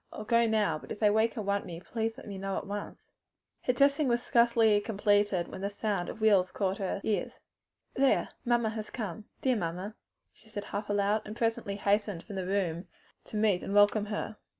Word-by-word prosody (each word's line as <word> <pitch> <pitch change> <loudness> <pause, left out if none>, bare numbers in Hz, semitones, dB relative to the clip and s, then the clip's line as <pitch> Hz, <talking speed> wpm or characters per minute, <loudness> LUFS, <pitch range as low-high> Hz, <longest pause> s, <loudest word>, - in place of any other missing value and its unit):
I'll 215 - -7
go 230 +2 +3
now, 210 -8 +1
but - - -12
if - - -5
they 210 -2 +4
wake 220 +3 +2
and 215 - -3
want 200 0 0
me 170 -2 -7
let 225 -1 -2
me 200 -2 -6
know 195 0 -2
at - - -4
once." 205 0 -7 0.5
Her 250 - +3
toilet 280 +3 +3
was 240 0 +1
scarcely 230 -3 +4
completed 205 -3 +1
when - - -8
the 200 - -1
sound 205 -3 -2
of 220 - -8
wheels 200 -4 +4
caught 195 -1 -1
her 195 0 -2
ears. 215 - -2 0.5
"There! 270 0 +2
mamma 240 -3 +2
has 215 -1 -5
come! 210 -3 -5 0.2
Dear, 260 - +3
dear 230 - -1
mamma!" 180 +5 -4 0.4
she 220 - -22
said 205 -2 -5
half 205 +1 -5
aloud, 205 +1 +2
and 210 - -8
presently 225 -3 -1
hastened 205 -3 0
from 205 - -9
the 185 -1 -3
room 185 -3 -1 0.4
to 215 - -6
meet 210 -4 +2
and 200 - -3
welcome 205 +1 +5
her. 210 0 -4
210 Hz, 205 wpm, -30 LUFS, 200-225 Hz, 0.5 s, welcome